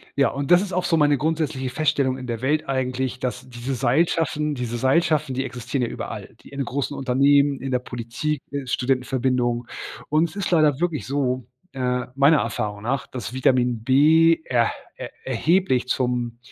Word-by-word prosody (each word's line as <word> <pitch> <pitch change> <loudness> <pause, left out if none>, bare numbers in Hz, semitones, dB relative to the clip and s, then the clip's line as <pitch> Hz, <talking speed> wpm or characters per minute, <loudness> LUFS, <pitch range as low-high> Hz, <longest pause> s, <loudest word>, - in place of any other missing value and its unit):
Ja, 140 -1 +3
und 140 +3 -4
das 175 - +7
ist 195 -3 -5
auch 180 - 0
so 165 - +2
meine 145 -2 +4
grundsätzliche 150 -4 -1
Feststellung 140 -4 +1
in 130 - -7
der 115 0 -4
Welt 150 +1 0
eigentlich, 130 -1 -1
dass 125 0 -4
diese 125 +2 -5
Seilschaften 150 +3 +1
diese 120 -2 -3
Seilschaften, 150 +1 +2
die 135 +1 -1
existieren 125 +1 -4
ja 120 - 0
überall. - - -7
Die - - -15
in 140 -1 -3
großen 140 +3 -3
Unternehmen, 140 +2 +3
in 135 0 -4
der 125 - +2
Politik, 125 +5 -4
äh, 140 -2 -4
Studentenverbindungen 125 -1 0 0.4
und 160 +2 +2
es 160 - -15
ist 200 -2 -2
leider 155 -4 +3
wirklich 170 -6 -1
so, 130 -3 -1 0.3
äh, 125 -1 -1
meiner 140 +3 +5
Erfahrung 105 -3 -3
nach, 135 +3 -2
dass 125 -1 -6
Vitamin 125 -3 +1
B 160 +6 +5
erh 120 -2 +2 0.3
er - - -7 0.2
erheblich 130 0 +1
zum 125 -2 -1
130 Hz, 175 wpm, -23 LUFS, 125-150 Hz, 0.4 s, das